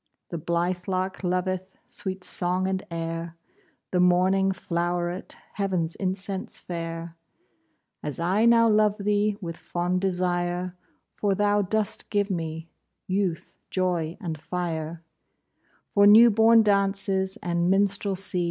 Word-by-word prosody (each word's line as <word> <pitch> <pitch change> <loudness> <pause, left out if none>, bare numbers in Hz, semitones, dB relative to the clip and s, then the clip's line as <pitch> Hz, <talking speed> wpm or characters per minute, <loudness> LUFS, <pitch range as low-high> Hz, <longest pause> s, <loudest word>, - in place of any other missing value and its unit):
The 170 - -4
blithe 175 +2 -1
lark 185 0 -2
loveth 185 +1 -2
Sweet 190 -6 -6
song 180 +1 0
and 190 0 -1
air, 165 0 -4 0.5
The 180 - +1
morning 185 +2 +3
flow'ret 175 0 -2 0.2
Heav'n's 185 -5 -1
incense 190 0 -3
fair, 165 -1 -6 0.9
As 150 +1 -5
I 190 +6 +2
now 230 0 +6
love 210 -1 +3
thee 205 0 +1
With 165 -2 -5
fond 180 +1 -2
desire, 180 -1 -1 0.4
For 200 -2 0
thou 205 +1 +2
dost 210 +1 -2
give 205 -1 0
me 165 -2 -4 0.4
Youth, 185 -3 -2
joy, 175 -3 -1
and 165 -7 -5
fire, 165 -1 -4 0.9
For 200 0 +6
new 225 +3 +9
born 225 +1 +6
dances 195 -1 +1
And 175 0 0
minstrelsy. 195 -1 +1
185 Hz, 120 wpm, -26 LUFS, 175-200 Hz, 0.9 s, new